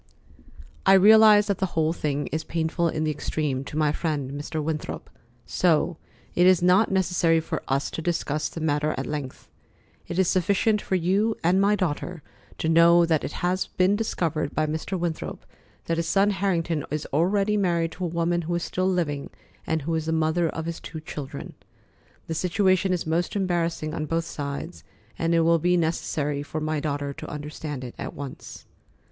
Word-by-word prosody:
"I 195 - +6
realize 210 +1 +7
that 200 -3 -1
the 190 - +1
whole 160 0 +2
thing 145 -3 -2
is 155 +1 -2
painful 165 +1 -1
in 155 0 -2
the 155 - +1
extreme 145 -2 -2
to 150 - -6
my 155 -1 +3
friend, 150 -4 -2
Mr. 145 +2 -4
Winthrop, 155 0 -4 0.3
so 170 -1 +1 0.4
it 175 +1 +4
is 185 -2 +5
not 185 +5 +4
necessary 180 -3 +2
for 160 - -4
us 135 +1 0
to - - -4
discuss 155 -3 -1
the 165 - -7
matter 150 0 0
at 130 - -2
length. 145 -2 -6 0.6
It 175 - -5
is 190 -2 +3
sufficient 200 +4 +2
for 190 - -1
you 195 +6 +1
and 180 +3 +3
my 205 +1 +4
daughter 175 -3 -3 0.3
to - - -2
know 170 +1 +6
that 160 -3 +1
it - - -3
has 185 +1 0
been 185 +2 +2
discovered 165 -9 -2
by 155 - +2
Mr. 160 +5 -3
Winthrop 170 -2 -4 0.4
that 165 - -1
his 165 0 -1
son 195 +4 +3
Harrington 170 -6 0
is 150 0 -3
already 195 +7 +2
married 170 -5 +1
to 185 - -7
a - - 0
woman 170 +1 0
who 170 +1 -2
is 170 - -2
still 185 +1 -1
living, 150 -6 -1 0.4
and 160 -2 0
who 165 +3 -2
is 160 -1 -1
the - - 0
mother 160 +1 +1
of 160 0 -5
his 170 0 -4
two 160 - -8
children. 145 -2 -7 0.7
The 165 - -4
situation 185 +2 +2
is 180 -2 -1
most 165 +4 -1
embarrassing 170 -5 -1
on 155 -2 -3
both 165 +1 -1
sides, 145 +4 -6 0.4
and 165 0 +1
it 165 - +4
will 165 0 +4
be 180 +2 +2
necessary 150 -3 -1
for 155 +2 -5
my 155 0 -1
daughter 145 -1 -2
to - - -8
understand 150 -2 -6
it 120 - -7
at - - -5
once." 140 -2 -8
165 Hz, 190 wpm, -25 LUFS, 155-180 Hz, 0.7 s, realize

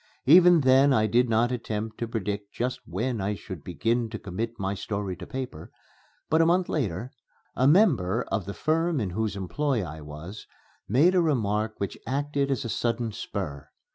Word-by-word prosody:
Even 175 +2 +7
then 135 +1 +5
I 110 -3 +3
did 120 +3 +2
not 115 +2 +2
attempt 110 -2 -4
to 115 - -2
predict 105 -2 -4
just 125 +2 -2
when 115 +5 -2
I 100 +2 -1
should 95 -6 -9
begin 115 +7 -1
to 110 - -5
commit 110 +4 -5
my 95 0 -1
story 100 -1 -4
to - - -9
paper. 130 -12 -6 0.6
But, 160 +1 +3
a - - +5
month 180 +1 +2
later, 115 - -2 0.4
a 130 - +3
member 130 - +4
of 105 -5 -1
the 100 - -5
firm 165 0 +1
in 100 -6 -2
whose 110 +2 -2
employ 120 +5 -1
I 80 -1 -8
was 75 +8 -9 0.4
made 145 - +4
a 180 - +4
remark 110 -8 0
which 100 - -4
acted 140 +1 -1
as 135 -1 -1
a - - -1
sudden 115 0 -1
spur. 85 -10 -5
115 Hz, 180 wpm, -26 LUFS, 100-135 Hz, 0.6 s, Even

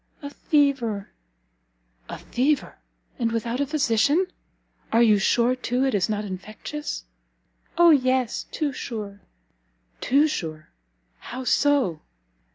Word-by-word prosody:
"A 285 - -6
fever." 275 -10 0 1.0
"A - - -5
fever, 280 +4 -1 0.4
and 230 -2 0
without 230 +2 -2
a 285 - 0
physician! 290 - +2 0.7
Are 230 +1 +5
you 215 -3 +5
sure, 240 +5 +2
too, 255 0 -1
it 265 - 0
is 200 0 +1
not 210 0 -2
infectious?" 215 - -6 0.7
"O 345 -1 +7
yes, 255 -4 +1
too 295 -3 -2
sure!" 210 -5 -6 0.8
"Too 285 +4 +3
sure? 155 - -5 0.5
how 255 +2 -7
so?" 260 - +2
250 Hz, 115 wpm, -24 LUFS, 215-285 Hz, 1.0 s, O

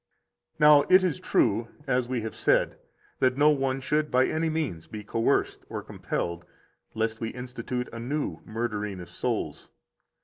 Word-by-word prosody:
42 - - -1
Now, 150 -1 +9
it 185 - +7
is 175 -7 0
true, 115 +3 +2 0.2
as 125 -1 +1
we 125 -2 -1
have 110 0 -5
said, - - +2 0.4
that 130 0 +2
no 150 +1 +6
one 135 -2 0
should 150 +3 0
by 130 +1 +4
any 160 +1 0
means 150 - -3
be 105 -1 -7
coerced 115 +2 0
or - - -5
compelled, 85 0 -3 0.5
lest 110 +1 -1
we 115 - -1
institute 125 0 -5
a 115 - -6
new 140 +6 -2
murdering 105 -3 -3
of 90 - -9
souls. - - -3
125 Hz, 165 wpm, -27 LUFS, 110-145 Hz, 0.5 s, Now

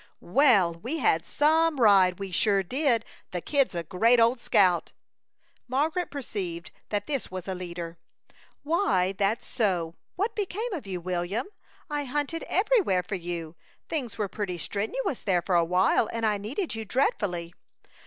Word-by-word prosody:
"Well, 225 - +5
we 240 - -4
had 165 - +1
some 315 0 +2
ride, 195 -5 +5
we 195 -1 -6
sure 195 +2 +2
did! 250 - +1 0.2
The 180 - -3
Kid's 275 - +1
a 170 - -2
great 225 +9 +3
old 235 +2 +3
scout." 180 -7 +3 0.7
Margaret 310 +8 0
perceived 190 -11 -5 0.2
that 205 -1 -1
this 275 -4 -3
was 185 0 -7
a 190 - -2
leader. 170 -2 -6 0.6
"Why, 220 - +2
that's 200 +3 -1
so, 180 -9 0 0.2
what 425 +5 -1
became 425 +3 -3
of 295 - -5
you, 185 -2 -3
William? 180 +5 -2 0.4
I 295 -2 -2
hunted 295 +4 -2
everywhere 380 - +2
for 180 - -7
you. 170 -3 -4 0.3
Things 265 -9 -3
were 210 -2 -1
pretty 190 -3 -4
strenuous 220 - -2
there 180 -3 +1
for 190 - -1
a 170 -1 +5
while, 180 +5 +2
and 230 -1 -2
I 210 -2 +1
needed 270 - -3
you 225 0 -4
dreadfully." 195 - -1
210 Hz, 155 wpm, -27 LUFS, 180-280 Hz, 0.7 s, Well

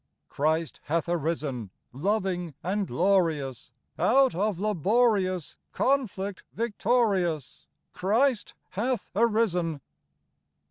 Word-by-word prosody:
Christ 160 +2 0
hath 165 +3 0
arisen! 155 - -2 0.2
Loving 180 - -1
and 195 +2 -1
glorious, 165 - +1 0.3
Out 265 +2 +4
of 195 0 -1
laborious 200 - +1 0.2
Conflict 210 -8 0
victorious, 205 - 0 0.3
Christ 230 +5 +1
hath 235 +4 -2
arisen. 205 -8 +1
190 Hz, 80 wpm, -27 LUFS, 165-220 Hz, 0.3 s, Out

